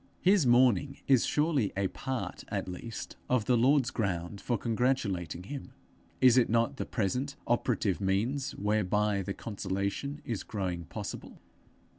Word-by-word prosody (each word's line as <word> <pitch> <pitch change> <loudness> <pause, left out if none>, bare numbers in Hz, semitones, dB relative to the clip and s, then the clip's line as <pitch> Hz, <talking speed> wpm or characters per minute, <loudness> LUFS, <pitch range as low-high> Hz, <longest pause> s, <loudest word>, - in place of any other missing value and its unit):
His 185 -6 +5
mourning 130 +3 +4
is 130 -4 +4
surely 150 -8 +1
a 100 -1 +2
part 130 +5 -4
at - - -3
least 100 +5 -7
of 125 -4 +2
the 125 - +3
Lord's 130 +2 +4
ground 100 -3 -2
for 120 - 0
congratulating 105 - -1
him: 135 +8 -7 0.5
is 130 -1 +7
it 120 - +2
not 115 +5 +1
the - - -3
present 125 +6 -1
operative 115 -5 +1
means 110 +9 0
whereby 105 0 +1
the 95 +1 -4
consolation 100 +7 -3
is 115 -5 -2
growing 90 -5 -3
possible? - - -7
115 Hz, 140 wpm, -30 LUFS, 100-130 Hz, 0.5 s, is